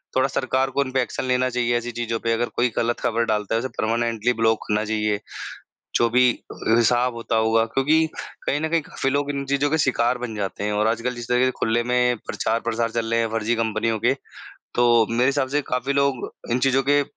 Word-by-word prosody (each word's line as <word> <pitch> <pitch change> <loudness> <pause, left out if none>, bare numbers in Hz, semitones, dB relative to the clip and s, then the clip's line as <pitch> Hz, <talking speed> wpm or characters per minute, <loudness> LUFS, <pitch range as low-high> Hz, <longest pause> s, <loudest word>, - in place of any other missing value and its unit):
थोड़ा 130 +1 +3
सरकार 130 0 0
को 140 +2 +1
इन 130 - -7
पे 130 0 +2
एक्शन 125 - -3
लेना 130 0 +1
चाहिए 120 -1 +1
ऐसी 120 +1 -4
चीज़ों 115 -1 -3
पे 115 - -1
अगर 120 +1 -1
कोई 125 0 +2
ग़लत 120 +1 0
ख़बर 115 0 0
डालता 105 -1 -1
है, 115 - +1
तो 130 - -4
परमानेंटली 115 +1 0
ब्लॉक 110 -1 +1
होना 105 +1 +1
चाहिए। 105 -1 0 0.8
जो 120 0 +3
भी 125 +2 +3 0.6
हिसाब 120 +2 +3
होता 115 -1 -2
होगा 110 0 +3
क्योंकि 150 +7 +2 0.4
कहीं 145 - 0
न 160 - -1
कहीं 165 0 +2
काफ़ी 135 -2 -3
लोग 145 0 0
इन 140 -1 -3
चीज़ों 140 +1 +1
के 160 - +1
शिकार 125 -4 +1
बन 120 -3 -5
जाते 100 0 -4
हैं 105 0 -1
और 105 +1 +1
आजकल 115 +2 -1
जिस 120 -1 -7
तरह 125 0 +3
के 130 - +2
खुले 115 +1 +1
में 125 0 +2
प्रचार-प्रसार 115 0 -1
चल 115 0 -2
रहे 115 - +2
हैं 115 - -1
फ़र्ज़ी 115 +1 0
कंपनियों 115 0 0
के, 120 +4 +3 0.6
तो 120 -2 +4
मेरे 120 +2 +2
हिसाब 140 -1 +1
से 145 +2 +1
काफ़ी 125 +2 -2
लोग 140 -2 0 0.2
इन 120 - +2
चीज़ों 135 0 +2
के 145 0 +4
120 Hz, 220 wpm, -23 LUFS, 115-130 Hz, 0.8 s, तो